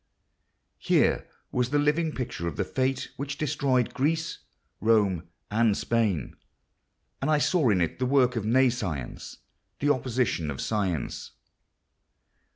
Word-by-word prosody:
Here - - +2 0.2
was 125 -1 0
the 145 - +1
living 150 +3 +2
picture 120 - -4
of 85 - -3
the 100 - +1
fate 130 +6 -1
which 140 +1 -4
destroyed 140 -5 +1
Greece, 160 +4 -1 0.4
Rome, 100 -6 +2 0.2
and 110 -1 +3
Spain; 105 - 0 0.9
and 135 - 0
I 155 - +4
saw 150 -2 +2
in 95 -4 +3
it 85 - -1
the 130 - +1
work 125 -2 +3
of 115 - -1
nescience—the 115 - -2
opposite 125 -5 +1
of 65 -2 -5
science. 100 -7 -2
125 Hz, 125 wpm, -27 LUFS, 105-140 Hz, 0.9 s, I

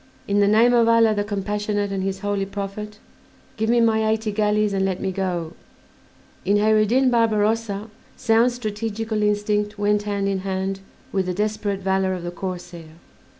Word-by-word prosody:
In 200 0 +2
the 200 - +4
name 225 +4 +5
of 235 -1 +4
Allah 230 -1 +5
the 205 -1 0
compassionate 205 0 -2
and 195 -1 -2
his 190 0 -3
holy 205 -1 -1
Prophet 205 +1 -6 0.6
give 220 0 -1
me 240 0 +4
my 220 -1 +3
eighty 220 0 0
galleys 210 0 +1
and 195 -1 0
let 190 -1 -1
me 190 - -2
go." 180 -3 -3 0.9
In 205 +1 +2
Kheyr 215 +1 +4
ed 215 - +2
Din 255 +3 +3
Barbarossa 220 -2 +1 0.3
sound 230 +2 +3
strategical 220 -1 -3
instinct 210 0 0
went 205 0 +1
hand 200 -1 -2
in 195 -1 0
hand 190 0 -3 0.3
with 190 -2 -1
the 180 - -2
desperate 210 -1 -2
valor 190 0 0
of 180 - -7
the 175 - -4
corsair. 175 -3 -7
205 Hz, 175 wpm, -22 LUFS, 195-220 Hz, 0.9 s, name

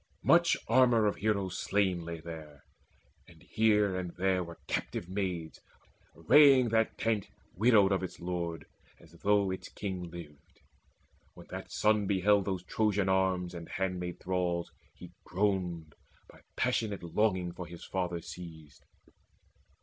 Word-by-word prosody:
Much - - +5
armour 120 -4 +4
of 105 - 0
heroes 100 -4 -1
slain 95 -4 0
Lay 85 0 -6
there; 80 -3 -10 0.6
and 80 -3 -18
here 105 -3 +2
and 90 -2 -4
there 95 0 +1
were 85 -1 -10
captive 85 - -3
maids 90 -4 -3 0.6
Arraying 130 - +6
that 110 0 +1
tent 110 -4 0 0.3
widowed 105 -1 +4
of 95 - +1
its 95 - -6
lord, 85 -2 -4 0.3
As 80 - -18
though 100 -1 +2
its 95 - -6
king 95 -4 -5
lived. 80 -4 -12 0.7
When - - -12
that - - -7
son 105 -1 +2
beheld 100 0 +3
Those 95 -3 -3
Trojan 105 -3 0
arms 95 -2 +1
and 85 -1 -8
handmaid 90 -2 -3
thralls, 90 -2 -2 0.2
he - - -12
groaned, 90 -4 -1 0.3
By - - -17 0.2
passionate 105 -5 -1
longing 90 0 0
for 90 0 -8
his 85 0 -10
father 90 -2 -2
seized. 80 -3 -11
95 Hz, 135 wpm, -31 LUFS, 85-105 Hz, 0.7 s, Arraying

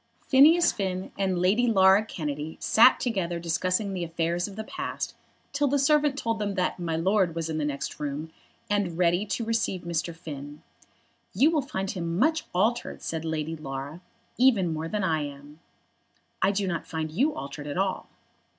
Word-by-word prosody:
Phineas 320 +6 +6
Finn 190 -2 -3
and 190 -2 0
Lady 200 +8 +3
Laura 195 -2 +5
Kennedy 150 -5 -5
sat 235 +4 +5
together 190 -8 -1
discussing 185 +4 -1
the 180 -2 -3
affairs 170 +1 -1
of 200 - -10
the 220 - -5
past 365 +10 -5 0.4
till 290 0 +2
the 285 +1 +2
servant 290 0 +3
told 230 -4 -1
them 205 -2 -2
that 180 -1 -1
"My 165 -2 -2
Lord" 185 0 +1
was 165 -1 -2
in 155 - -2
the 150 - 0
next 140 -1 -4
room, 150 +2 -4 0.4
and 200 -5 0
ready 175 +3 +2
to 230 - -2
receive 225 -5 -1
Mr. 170 0 -3
Finn. 145 -3 -9 0.7
"You 275 - +5
will 310 -3 +2
find 195 -6 -3
him 170 -2 -3
much 315 - +2
altered," 220 +7 0
said 160 -1 -3
Lady 160 0 -2
Laura, 140 +2 -6 0.4
"even 215 -10 +4
more 160 +1 -3
than 210 +3 -2
I 160 -4 +1
am." 145 +1 -8 0.8
"I 190 - +4
do 200 0 0
not 170 -2 -3
find 160 -1 -3
you 275 - +1
altered 145 +1 -7
at 145 - -4
all." 190 0 -1
180 Hz, 180 wpm, -27 LUFS, 160-215 Hz, 0.8 s, Phineas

